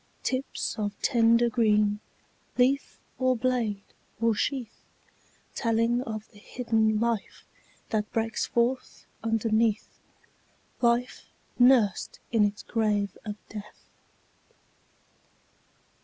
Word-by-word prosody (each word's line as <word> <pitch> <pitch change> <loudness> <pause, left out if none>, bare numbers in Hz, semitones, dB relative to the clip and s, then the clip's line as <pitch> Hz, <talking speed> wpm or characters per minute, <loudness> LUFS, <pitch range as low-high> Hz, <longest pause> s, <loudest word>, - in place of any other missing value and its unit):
Tips 260 -3 -2
of 205 -1 -3
tender 235 -2 +4
green, 210 -3 +2 0.6
Leaf, 260 +3 +2 0.2
or 255 -1 +3
blade, 230 -5 0 0.4
or 230 0 +3
sheath; 245 0 -3 0.7
Telling 230 +1 +1
of 220 -3 -5
the 205 - -17
hidden 220 -1 0
life 230 -2 -2 0.4
That 215 -1 -1
breaks 225 -1 -1
forth 245 +2 -1 0.2
underneath, 225 -1 0 0.8
Life 240 +1 +1 0.3
nursed 245 -5 +4
in 225 -3 +4
its 205 0 -1
grave 210 -4 0
by 210 -2 -5
Death. 210 -1 -10
225 Hz, 95 wpm, -27 LUFS, 210-240 Hz, 0.8 s, tender